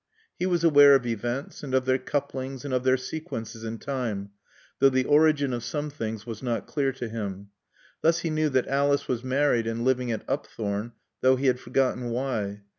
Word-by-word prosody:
He 180 - +1
was 175 -2 +1
aware 145 -3 +8
of 130 -2 +1
events 120 +4 -3
and 135 -3 -2
of 130 0 +2
their 130 0 +2
couplings 135 0 -3
and 140 - -3
of 125 -1 +1
their 130 0 +4
sequences 115 -6 -6
in 115 0 -4
time, 115 -7 -3 0.5
though 135 - +6
the 130 -1 +1
origin 145 -3 +4
of 120 -1 -3
some 150 +2 -3
things 110 -6 -5
was 115 -3 -7
not 120 -3 -2
clear 140 -3 0
to 125 -2 -5
him. 100 -3 -5 0.5
Thus 165 +1 +3
he 165 - -2
knew 155 0 +1
that 130 -2 +1
Alice 140 +1 +1
was 120 -1 -2
married 130 -3 +2
and 115 +1 -2
living 125 -2 +1
at 110 - -4
Upthorne, 105 +2 -3 0.3
though 130 0 +5
he 130 +2 -3
had 125 -1 +3
forgotten 125 -2 0
why. 115 -5 -2
130 Hz, 195 wpm, -26 LUFS, 115-140 Hz, 0.5 s, aware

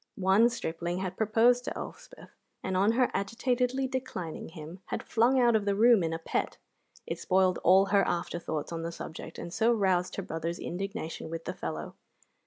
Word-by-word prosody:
One 195 +5 +4
stripling 175 -6 -3
had 185 0 -3
proposed 225 +4 +3
to - - -4
Elspeth, - - -10 0.3
and 190 - -2
on 200 +4 +3
her 250 +1 +2
agitatedly 250 +6 0
declining 255 -11 -5
him, 160 +2 -9
had - - -3
flung 245 +4 +3
out 240 -2 +4
of 210 -2 +1
the 200 -1 +1
room 230 0 +6
in 165 -1 -1
a 165 - -2
pet. 165 - -2 0.5
It - - -4
spoiled 185 -1 +2
all 190 +2 +5
her 200 0 +3
after 175 0 -2
thoughts 155 -2 -4
on 165 -1 -3
the 165 +1 -4
subject, 160 -1 -8
and 170 - -7
so 225 +4 +3
roused 185 -5 +1
her 195 - -3
brother's 165 -1 -4
indignation 190 -3 -5
with 165 0 -6
the 180 - -3
fellow. 80 - -5
190 Hz, 190 wpm, -29 LUFS, 170-230 Hz, 0.5 s, room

